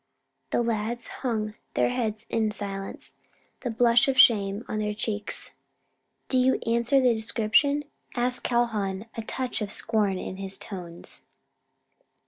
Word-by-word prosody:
The 240 Hz, -, +1 dB
lads 230 Hz, +1 st, -2 dB
hung 215 Hz, -4 st, -1 dB, 0.2 s
their -, -, +3 dB
heads 225 Hz, -3 st, -2 dB
in 220 Hz, -1 st, +1 dB
silence, 195 Hz, -1 st, -5 dB, 0.5 s
the 250 Hz, -, -3 dB
blush 235 Hz, +1 st, +4 dB
of 270 Hz, -1 st, +1 dB
shame 210 Hz, -4 st, +5 dB
on 215 Hz, -, -2 dB
their 210 Hz, 0 st, -1 dB
cheeks. 210 Hz, -1 st, -3 dB, 0.8 s
"Do 260 Hz, -, +2 dB
you 260 Hz, +1 st, +4 dB
answer 235 Hz, +4 st, +3 dB
the 250 Hz, -2 st, +4 dB
description?" 230 Hz, +6 st, +2 dB, 0.3 s
asked 245 Hz, 0 st, 0 dB
Calhoun, 215 Hz, -5 st, 0 dB
a 225 Hz, -, -3 dB
touch 250 Hz, +2 st, -2 dB
of 210 Hz, -1 st, -3 dB
scorn 210 Hz, -4 st, +1 dB
in 185 Hz, -, -5 dB
his 195 Hz, 0 st, -2 dB
tones. 175 Hz, -4 st, -8 dB
225 Hz, 135 wpm, -27 LUFS, 205-240 Hz, 0.8 s, shame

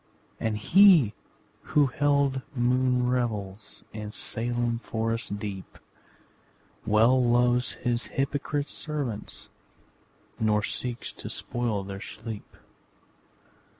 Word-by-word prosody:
And 110 Hz, -1 st, -1 dB
he 170 Hz, -, +6 dB, 0.5 s
who 150 Hz, -1 st, +3 dB
held 140 Hz, 0 st, +1 dB
moon 125 Hz, 0 st, +2 dB
revels 105 Hz, -5 st, -3 dB
In 105 Hz, -1 st, -6 dB
Salem 120 Hz, +1 st, -2 dB
forest 115 Hz, -2 st, -3 dB
deep, 100 Hz, -2 st, -7 dB, 1.1 s
Well 115 Hz, +4 st, +4 dB
loves 120 Hz, +1 st, +3 dB
his 120 Hz, -1 st, -2 dB
hypocrite 145 Hz, +1 st, -2 dB
servants 140 Hz, -9 st, -5 dB, 0.9 s
Nor 105 Hz, -1 st, +2 dB
seeks 120 Hz, +1 st, -2 dB
to -, -, -8 dB
spoil 115 Hz, -5 st, -1 dB
their 95 Hz, 0 st, -7 dB
sleep. 110 Hz, -1 st, -8 dB
120 Hz, 90 wpm, -27 LUFS, 110-130 Hz, 1.1 s, he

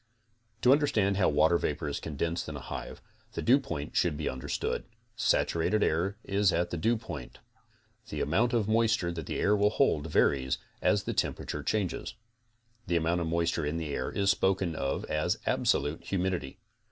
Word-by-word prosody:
To 125 Hz, -, +6 dB
understand 125 Hz, -9 st, +3 dB
how 95 Hz, -, +4 dB
water 80 Hz, +3 st, +4 dB
vapor 75 Hz, 0 st, -2 dB
is 70 Hz, -, -2 dB
condensed 80 Hz, +2 st, -3 dB
'in 75 Hz, -, -6 dB
a -, -, -5 dB
hive, 65 Hz, -, -7 dB, 0.3 s
the -, -, -3 dB
dewpoint 120 Hz, -, +1 dB
should 85 Hz, -5 st, +2 dB
be 75 Hz, -, -3 dB
understood. 65 Hz, +3 st, -2 dB, 0.3 s
Saturated 105 Hz, +1 st, +2 dB
air 90 Hz, +6 st, 0 dB
is 100 Hz, -1 st, +2 dB
at 85 Hz, +1 st, 0 dB
the 85 Hz, -, -2 dB
dewpoint. 90 Hz, -, -2 dB, 0.7 s
The -, -, -4 dB
amount 110 Hz, +12 st, +2 dB
of 115 Hz, -5 st, +1 dB
moisture 110 Hz, -5 st, +2 dB
that 80 Hz, -3 st, -6 dB
the -, -, -3 dB
air 105 Hz, -, +3 dB
will 105 Hz, 0 st, +3 dB
hold 105 Hz, -, +1 dB
varies 65 Hz, -4 st, +2 dB, 0.2 s
as -, -, +2 dB
the -, -, -3 dB
tem -, -, 0 dB
perature -, -, -5 dB
changes. 105 Hz, 0 st, -2 dB, 0.7 s
The 85 Hz, -, +1 dB
amount 85 Hz, +2 st, +1 dB
of 85 Hz, -, -1 dB
moisture 85 Hz, 0 st, 0 dB
in 75 Hz, +3 st, -1 dB
the 80 Hz, -3 st, -3 dB
air -, -, -2 dB
is 100 Hz, 0 st, +2 dB
spoken 95 Hz, -4 st, +1 dB
of 70 Hz, -2 st, -2 dB
as 75 Hz, 0 st, 0 dB
absolute 75 Hz, +3 st, +1 dB
humidity. 90 Hz, -7 st, -2 dB
85 Hz, 175 wpm, -29 LUFS, 75-105 Hz, 0.7 s, To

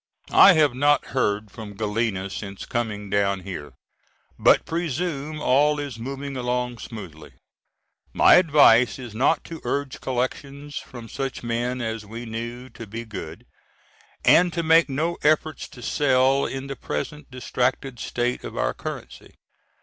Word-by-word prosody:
I 195 Hz, -, +9 dB
have 150 Hz, -5 st, +3 dB
not 145 Hz, +3 st, +3 dB
heard 105 Hz, -5 st, 0 dB
from 105 Hz, -2 st, -9 dB
Galena 105 Hz, -2 st, -2 dB
since 100 Hz, -1 st, -7 dB
coming 105 Hz, -4 st, -3 dB
down 100 Hz, -1 st, +1 dB
here, 80 Hz, -7 st, -7 dB, 0.7 s
but -, -, +5 dB
presume 155 Hz, -2 st, -3 dB
all 150 Hz, +2 st, +3 dB
is 140 Hz, -6 st, -5 dB
moving 135 Hz, +3 st, -5 dB
along 125 Hz, -1 st, -2 dB
smoothly. 95 Hz, -9 st, -9 dB, 0.8 s
My -, -, +6 dB
advice 145 Hz, -9 st, +6 dB
was 120 Hz, -4 st, -9 dB
not 135 Hz, +7 st, +2 dB
to 165 Hz, -1 st, -9 dB
urge 140 Hz, -1 st, -3 dB
collections 140 Hz, +3 st, -3 dB
from 120 Hz, -2 st, -8 dB
such 135 Hz, +2 st, -5 dB
men 120 Hz, +2 st, -2 dB
as 110 Hz, -1 st, -3 dB
we 115 Hz, +3 st, -8 dB
knew 120 Hz, +2 st, -6 dB
to 115 Hz, -, -10 dB
be 115 Hz, +3 st, -6 dB
good, 90 Hz, -7 st, -8 dB, 0.8 s
and 180 Hz, 0 st, +6 dB
to 170 Hz, -, -1 dB
make 160 Hz, 0 st, +5 dB
no 160 Hz, +5 st, -1 dB
efforts 155 Hz, 0 st, +1 dB
to 120 Hz, -, -13 dB
sell 135 Hz, 0 st, +2 dB
in 135 Hz, 0 st, -5 dB
the 140 Hz, 0 st, -5 dB
present 135 Hz, -, -5 dB
distracted 125 Hz, 0 st, -2 dB
state 120 Hz, +1 st, -2 dB
of -, -, -7 dB
our -, -, 0 dB
currency. -, -, -8 dB
125 Hz, 145 wpm, -24 LUFS, 110-145 Hz, 0.8 s, I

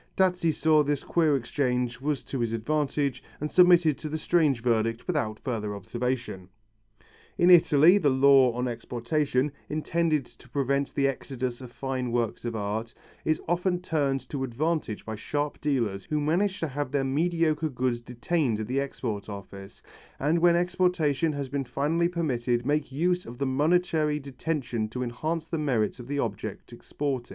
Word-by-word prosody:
Dazzi 180 Hz, -3 st, +3 dB
saw 155 Hz, 0 st, +3 dB
that 145 Hz, -, -2 dB
this 145 Hz, -2 st, 0 dB
queer 160 Hz, -4 st, +2 dB
exchange 125 Hz, -1 st, -1 dB
was 145 Hz, 0 st, -1 dB
to 135 Hz, -, -5 dB
his 115 Hz, -1 st, -1 dB
advantage 140 Hz, +2 st, -1 dB, 0.2 s
and 150 Hz, +1 st, -3 dB
submitted 175 Hz, -4 st, +5 dB
to 155 Hz, -, -5 dB
the 155 Hz, -, -2 dB
strange 155 Hz, -7 st, +2 dB
verdict 115 Hz, -1 st, 0 dB
without 125 Hz, -12 st, -1 dB
further 110 Hz, -6 st, -3 dB
observation. 115 Hz, -2 st, -4 dB, 0.9 s
In 175 Hz, +1 st, +5 dB
Italy, 170 Hz, +2 st, +7 dB
the 150 Hz, -7 st, +3 dB
law 135 Hz, -1 st, +6 dB
on 125 Hz, +1 st, -2 dB
exportation, 125 Hz, +4 st, -1 dB, 0.2 s
intended 155 Hz, -1 st, 0 dB
to 125 Hz, -, -18 dB
prevent 140 Hz, +1 st, -1 dB
the 140 Hz, -1 st, +3 dB
exodus 130 Hz, -2 st, -4 dB
of 125 Hz, -2 st, -9 dB
fine 130 Hz, -2 st, -3 dB
works 120 Hz, -1 st, -1 dB
of 115 Hz, -1 st, -3 dB
art, 110 Hz, +2 st, -3 dB, 0.3 s
is 155 Hz, 0 st, 0 dB
often 180 Hz, +1 st, +1 dB
turned 145 Hz, -6 st, -1 dB
to 140 Hz, -2 st, -3 dB
advantage 135 Hz, -2 st, -2 dB
by 110 Hz, -, -4 dB
sharp 145 Hz, +7 st, -3 dB
dealers 115 Hz, -10 st, -1 dB
who 150 Hz, -, -1 dB
manage 185 Hz, +7 st, +1 dB
to 165 Hz, -, 0 dB
have 145 Hz, 0 st, -3 dB
their 140 Hz, 0 st, 0 dB
mediocre 155 Hz, +2 st, +1 dB
goods 125 Hz, -2 st, -1 dB
detained 125 Hz, 0 st, -1 dB
at 110 Hz, -, -2 dB
the 130 Hz, +5 st, -1 dB
Export 110 Hz, -7 st, -4 dB
Office, 100 Hz, -1 st, -10 dB, 0.4 s
and 155 Hz, +5 st, +2 dB
when 170 Hz, 0 st, +5 dB
exportation 175 Hz, -4 st, +1 dB
has 140 Hz, -2 st, -4 dB
been 140 Hz, +1 st, -2 dB
finally 150 Hz, +7 st, 0 dB
permitted 125 Hz, -8 st, -1 dB
make 145 Hz, 0 st, 0 dB
use 175 Hz, +6 st, 0 dB
of 120 Hz, +1 st, -9 dB
the 140 Hz, -, -1 dB
momentary 155 Hz, +2 st, +2 dB
detention 135 Hz, -4 st, -3 dB
to 125 Hz, +3 st, -3 dB
enhance 155 Hz, +7 st, -3 dB
the 165 Hz, -, -2 dB
merits 125 Hz, -6 st, 0 dB
of 120 Hz, -, -9 dB
the 145 Hz, +1 st, -3 dB
object 115 Hz, -7 st, -4 dB
exported. 135 Hz, -4 st, -4 dB
140 Hz, 165 wpm, -27 LUFS, 120-155 Hz, 0.9 s, Italy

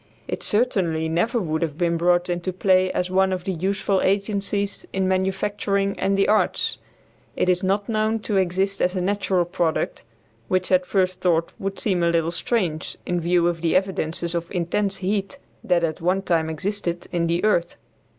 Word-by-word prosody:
It -, -, -4 dB
certainly 185 Hz, -8 st, +1 dB
never 175 Hz, +9 st, +1 dB
could 160 Hz, -5 st, -2 dB
have 155 Hz, -3 st, -2 dB
been 170 Hz, -1 st, +1 dB
brought 175 Hz, +1 st, +2 dB
into 175 Hz, +1 st, -2 dB
play 185 Hz, 0 st, +2 dB
as 180 Hz, 0 st, -2 dB
one 190 Hz, 0 st, +3 dB
of 185 Hz, -1 st, -2 dB
the 195 Hz, -, -2 dB
useful 190 Hz, +2 st, 0 dB
agencies 200 Hz, 0 st, 0 dB
in 190 Hz, -1 st, 0 dB
manufacturing 195 Hz, +1 st, 0 dB
and 195 Hz, 0 st, +1 dB
the 195 Hz, -, +3 dB
arts. 215 Hz, +1 st, +1 dB, 0.6 s
It -, -, 0 dB
is 180 Hz, 0 st, +2 dB
not 200 Hz, +1 st, 0 dB
known 220 Hz, 0 st, +1 dB
to 210 Hz, -2 st, -1 dB
exist 190 Hz, +2 st, 0 dB
as 180 Hz, +2 st, +1 dB
a -, -, 0 dB
natural 190 Hz, -2 st, +1 dB
product, 170 Hz, -2 st, -1 dB, 0.4 s
which 185 Hz, 0 st, 0 dB
at 180 Hz, -1 st, +3 dB
first 185 Hz, -1 st, 0 dB
thought 170 Hz, -2 st, +1 dB
would 195 Hz, 0 st, -4 dB
seem 185 Hz, -5 st, 0 dB
a 170 Hz, -, +3 dB
little 165 Hz, 0 st, +1 dB
strange 170 Hz, -4 st, -2 dB
in 175 Hz, -1 st, -1 dB
view 170 Hz, 0 st, +2 dB
of 170 Hz, -2 st, -1 dB
the 170 Hz, 0 st, +1 dB
evidences 175 Hz, -3 st, -1 dB
of 170 Hz, 0 st, -3 dB
intense 195 Hz, +2 st, -1 dB
heat 195 Hz, 0 st, -1 dB, 0.3 s
that 175 Hz, -2 st, +2 dB
at 160 Hz, -1 st, -2 dB
one 185 Hz, +3 st, +1 dB
time 165 Hz, -4 st, +1 dB
existed 175 Hz, +2 st, -3 dB
in 170 Hz, -1 st, 0 dB
the 170 Hz, +1 st, 0 dB
earth. 175 Hz, -5 st, +1 dB
185 Hz, 180 wpm, -23 LUFS, 170-195 Hz, 0.6 s, one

